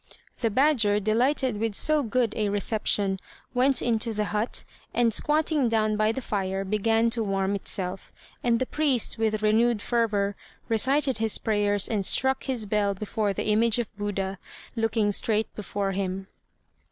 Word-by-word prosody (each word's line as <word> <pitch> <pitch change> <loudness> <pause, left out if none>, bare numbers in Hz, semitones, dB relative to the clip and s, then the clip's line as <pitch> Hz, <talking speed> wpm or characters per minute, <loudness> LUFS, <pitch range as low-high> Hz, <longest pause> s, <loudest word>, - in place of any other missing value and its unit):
The 230 - +1
badger, 225 -4 +3
delighted 240 +3 +1
with 225 -2 -1
so 310 +5 +4
good 240 -2 0
a 210 -2 0
reception, 205 -1 0 0.3
went 260 +2 +2
into 230 -1 0
the 210 0 -1
hut, 215 +3 -1 0.3
and 235 -2 +3
squatting 300 0 +2
down 215 -1 +1
by 215 +1 +2
the 260 +3 -5
fire 195 -2 -2
began 225 +3 +1
to 230 -1 +1
warm 195 -1 -1
itself; 190 -1 -4 0.3
and 235 -1 +2
the 260 - 0
priest, 270 -7 0
with 215 -1 0
renewed 225 +1 +3
fervour, 205 -3 0 0.3
recited 265 +3 +2
his 220 -1 +1
prayers 205 -2 +1
and 210 -3 -1
struck 265 +7 +1
his 250 -5 -2
bell 205 -1 0
before 210 +1 -2
the 195 - -4
image 225 +2 +3
of 235 -4 -4
Buddha, 195 -2 -3 0.4
looking 225 -2 +1
straight 215 +1 0
before 200 -1 -3
him. 190 0 -3
215 Hz, 155 wpm, -26 LUFS, 205-235 Hz, 0.4 s, so